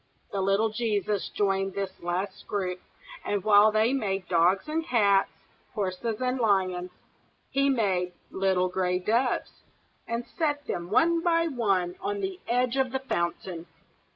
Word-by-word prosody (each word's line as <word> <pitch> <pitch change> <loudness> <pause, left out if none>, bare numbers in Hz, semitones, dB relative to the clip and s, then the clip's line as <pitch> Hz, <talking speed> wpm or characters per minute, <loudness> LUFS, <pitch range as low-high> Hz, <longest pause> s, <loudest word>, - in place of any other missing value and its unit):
The 195 - -1
little 195 +3 +2
Jesus 210 -3 -1
joined 195 -1 0
this 195 -1 -4
last 185 +3 -3
group, 185 -3 -2 0.4
and 205 -2 -1
while 210 0 +6
they 220 +4 +2
made 195 -7 -1
dogs 180 - +3
and 320 +2 -1
cats, 200 -8 +3 0.5
horses 210 +2 -2
and 255 0 -1
lions, 185 -5 +1 0.6
he 275 +1 +2
made 190 -8 +1 0.2
little 190 -1 +1
gray 180 0 0
doves, 235 +7 0 0.5
and 235 +1 -3
set 290 -3 -2
them 170 0 -4
one 330 - +3
by 335 -1 +2
one 195 - 0
on 405 +2 -2
the 385 -1 -4
edge 250 +2 +1
of 265 -2 +1
the 265 - 0
fountain. 170 -6 -3
205 Hz, 145 wpm, -27 LUFS, 185-250 Hz, 0.6 s, while